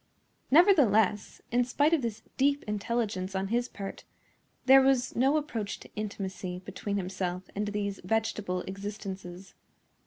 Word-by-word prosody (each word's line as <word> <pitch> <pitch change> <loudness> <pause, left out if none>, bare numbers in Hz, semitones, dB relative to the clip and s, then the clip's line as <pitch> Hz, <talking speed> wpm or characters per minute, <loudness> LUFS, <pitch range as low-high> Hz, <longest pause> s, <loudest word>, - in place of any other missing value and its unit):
Nevertheless, 250 - +4
in 245 +1 +3
spite 290 +6 +2
of 320 - +3
this 230 -3 -4
deep 280 +1 +2
intelligence 210 -3 -2
on 190 0 -1
his 240 +2 0
part, 195 -1 -7 0.6
there 270 +1 +8
was 265 -2 +2
no 270 +5 +3
approach 230 -9 -3
to - - -14
intimacy 190 -3 -4
between 200 -1 -3
himself 185 -1 -3
and 210 +1 -1
these 205 -1 -2
vegetable 205 -2 -1
existences. 195 -2 -7
210 Hz, 130 wpm, -29 LUFS, 195-245 Hz, 0.6 s, there